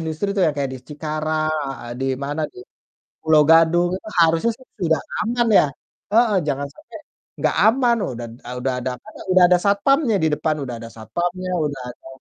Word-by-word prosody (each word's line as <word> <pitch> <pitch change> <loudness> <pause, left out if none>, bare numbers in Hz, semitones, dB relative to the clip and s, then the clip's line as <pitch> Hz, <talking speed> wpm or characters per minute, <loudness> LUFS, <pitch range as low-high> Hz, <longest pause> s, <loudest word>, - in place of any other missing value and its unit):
industri 160 +5 -3
tuh 190 - +2
yang 150 - 0
kayak 140 -2 -1
di - - -7
Cikarang 155 +1 -2 0.2
heeh, 125 -3 -7
di 135 - -1 0.2
mana, 145 +3 -3
di - - -15 0.6
Pulo 160 -1 +4
Gadung, 165 +2 +5
itu - - -15
harusnya 165 +8 +3
sih 260 - -18 0.2
sudah 160 -3 +2 0.2
aman 235 +2 0
ya. - - +4 0.5
Heeh, 225 -3 +4
jangan 140 0 -1
sampai 305 - -13 0.4
nggak - - +1
aman, 240 0 +3 0.2
udah 120 - -6
d - - -12 0.2
udah 130 0 -1
ada 130 - -3
apanya, 215 - -14
udah 185 0 +6
ada 180 - +6
satpamnya 225 +4 +3
di - - +4
depan, 155 +1 0
udah 125 -2 -5
ada 115 - -8
satpamnya, 175 +10 -3 0.2
udah 140 -3 -4
ada - - -17
160 Hz, 185 wpm, -21 LUFS, 145-200 Hz, 0.6 s, udah